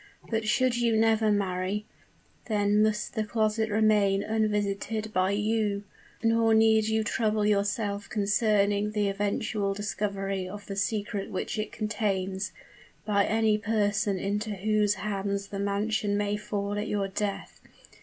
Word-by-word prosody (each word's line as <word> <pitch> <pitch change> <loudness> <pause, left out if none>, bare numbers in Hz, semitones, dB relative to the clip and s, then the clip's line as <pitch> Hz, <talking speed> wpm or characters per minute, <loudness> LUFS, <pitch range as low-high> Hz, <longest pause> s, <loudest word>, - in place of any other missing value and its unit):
But 220 -1 -1
should 250 +2 +2
you 235 -2 +2
never 220 -1 +3
marry, 195 +1 -1 0.6
then 205 -1 +2
must 215 -1 0
the 220 - 0
closet 220 0 0
remain 210 -2 +3
unvisited 215 0 -1
by 185 0 +2
you; 210 0 0 0.4
nor 225 0 +4
need 220 -1 +4
you 220 0 +1
trouble 215 -2 0
yourself 205 0 0
concerning 205 0 +1
the 205 -2 +1
eventual 200 0 -1
discovery 195 -1 -2
of 205 +1 -8
the 195 - -6
secret 205 0 -2
which 190 - -3
it 215 - -3
contains, 195 -3 -2 0.5
by 200 -2 +2
any 220 -1 +2
person 210 -2 +1
into 205 +2 -2
whose 210 +1 +1
hands 200 0 -3
the 200 - -5
mansion 205 +1 0
may 205 0 0
fall 205 -1 -3
at 210 - -3
your 200 -1 -1
death. 200 +1 -4
210 Hz, 135 wpm, -28 LUFS, 200-215 Hz, 0.6 s, nor